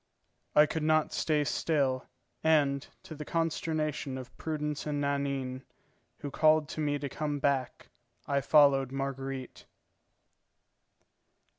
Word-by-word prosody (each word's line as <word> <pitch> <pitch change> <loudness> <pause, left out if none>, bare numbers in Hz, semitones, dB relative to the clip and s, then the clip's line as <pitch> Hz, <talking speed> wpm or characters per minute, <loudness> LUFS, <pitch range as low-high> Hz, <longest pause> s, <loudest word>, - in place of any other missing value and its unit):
I 150 - +8
could 160 +1 -3
not 155 0 +2
stay 150 -2 +1
still; 140 -3 0 0.4
and, 145 -3 +3 0.2
to - - -9
the 150 0 -6
consternation 155 -3 -2
of 130 -1 -9
Prudence 150 -2 -3
and 145 -1 -1
Nanine, 140 -2 -2 0.6
who 145 - -5
called 155 0 +4
to 155 - -4
me 145 -1 +1
to 140 0 -4
come 145 +1 -3
back, 135 -3 -1 0.4
I 140 -1 +1
followed 140 -2 +5
Marguerite. 135 -1 -5
145 Hz, 120 wpm, -30 LUFS, 135-155 Hz, 0.6 s, I